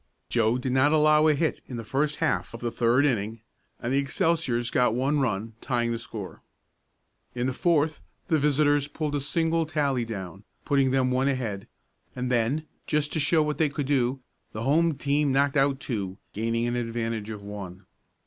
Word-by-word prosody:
Joe 115 0 +2
did 125 0 -3
not 130 +3 +4
allow 155 0 +5
a 155 - +4
hit 160 +1 -1
in 125 - -6
the 115 - -5
first 145 +6 0
half - - -1
of - - -8
the 120 0 -2
third 120 +5 +3
inning 110 -4 -1 0.4
and 120 +2 -2
the 140 - +3
Excelsiors 140 -5 0
got 125 -3 +2
one 135 +4 +1
run, 115 -3 -1
tying 120 -3 0
the 115 - -2
score. 110 -5 -8 0.9
In 120 0 0
the 130 - 0
fourth 155 0 +1 0.3
the 160 -4 +2
visitors 145 0 +2
pulled 150 0 -3
a 145 - 0
single 165 +2 0
tally 140 -5 0
down, 100 -3 -7 0.2
putting 140 -2 +3
them 130 -1 +2
one 130 +2 +2
ahead, 115 -8 -2 0.5
and 125 0 -2
then, 125 +6 +1 0.2
just 150 -1 0
to - - 0
show 155 +2 +3
what 150 0 -2
they 155 -2 +3
could 140 0 -3
do, 130 -1 +1 0.3
the 110 - -4
home 160 +4 +3
team 145 0 +1
knocked 140 +1 +2
out 135 -1 +2
two, 100 -8 -4 0.2
gaining 115 +2 -1
an 120 0 -1
advantage 115 -2 -3
of 105 -2 -7
one. 100 -2 -8
130 Hz, 185 wpm, -26 LUFS, 115-145 Hz, 0.9 s, allow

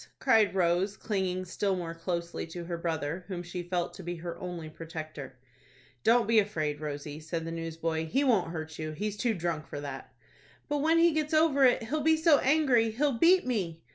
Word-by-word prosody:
cried 215 -3 +3
Rose, 185 +2 +1
clinging 185 -3 -2
still 195 +2 -1
more 170 -2 -4
closely 170 0 -4
to 170 +1 -7
her 170 0 -4
brother, 165 0 -3
whom 180 -3 -5
she 175 +1 -5
felt 175 0 -2
to - - -9
be 175 0 -4
her 170 0 -6
only 175 -3 -6
protector. 155 -4 -8 0.7
"Don't 230 -1 +4
be 225 -1 +5
afraid, 155 -8 -1
Rosie," 145 0 -5
said 165 +1 -4
the 165 - -4
newsboy. 165 -1 -3
"He 270 - +1
won't 220 -11 +2
hurt 160 -1 -6
you. 155 0 -4
He's 210 +6 -3
too 225 +2 0
drunk 165 -3 -3
for 145 - -6
that." 140 -2 -7 0.6
"But 295 -1 0
when 320 +3 +3
he 335 0 +5
gets 310 0 0
over 305 -4 +5
it, 245 -2 +4
he'll 300 +7 -2
be 320 +2 +4
so 315 -2 +5
angry, 265 -5 +3
he'll 255 +2 0
beat 360 +5 +5
me." 180 -10 -2
180 Hz, 200 wpm, -29 LUFS, 165-230 Hz, 0.7 s, be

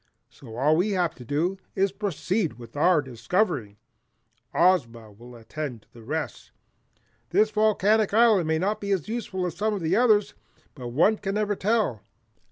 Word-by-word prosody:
So 115 -5 -12
all 150 +5 +3
we 200 +4 +1
have 180 -3 0
to 125 - -12
do 165 +10 -1 0.2
is 195 0 +1
to 195 - -28
proceed 195 -2 -1
with 120 0 -13
our 155 +1 +3
discovering. 125 - -1 0.7
Ozma 120 - +1
will 120 +4 -14
attend 120 0 -7
to - - -36
the 115 - -14
rest. 150 +7 -5 0.8
This 215 +4 +3
volcanic 215 0 +2
island 215 -6 +4
may 160 0 +1
not 205 +5 -1
be 200 - -4
as 195 -4 0
useful 210 -5 -3
as 175 -2 -4
some 215 +3 -1
of 195 - -5
the 160 - +1
others, 215 -4 +3 0.4
but 125 -4 -8
one 165 - +2
can 195 0 -3
never 210 -1 0
tell. 205 - 0
180 Hz, 175 wpm, -25 LUFS, 130-210 Hz, 0.8 s, island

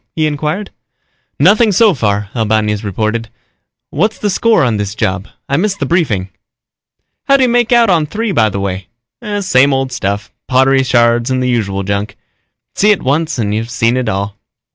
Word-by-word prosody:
he 155 - +1
inquired. 155 +6 -3 0.7
"Nothing 215 +1 +4
so 210 +1 +4
far," 105 -6 -1
Albañez 110 -2 0
reported. 110 +3 -2 0.6
"What's 205 +9 0
the 205 - -1
score 220 -3 +2
on 120 -5 +1
this 105 +1 -4
job? 95 0 -2 0.2
I 140 - 0
missed 200 +3 0
the - - -2
briefing." 115 - 0 1.0
"How'd 275 -1 +4
you 255 - +4
make 240 -1 +1
out 235 -4 +4
on 160 -4 +2
III, 225 0 -2
by 110 - +2
the 100 - -4
way?" 95 -1 -4 0.5
"Same 140 -6 +3
old 135 -1 -2
stuff, 100 -3 -3 0.2
pottery 135 +1 +3
shards 120 -1 +2
and 130 0 0
the 125 0 0
usual 100 -5 -1
junk. 100 +1 -3 0.6
See 210 - +2
it 210 - +2
once 155 +3 0
and 105 -3 -1
you've 110 +2 -3
seen 115 0 +1
it 130 -3 -1
all." 100 0 -3
125 Hz, 175 wpm, -14 LUFS, 105-175 Hz, 1.0 s, Nothing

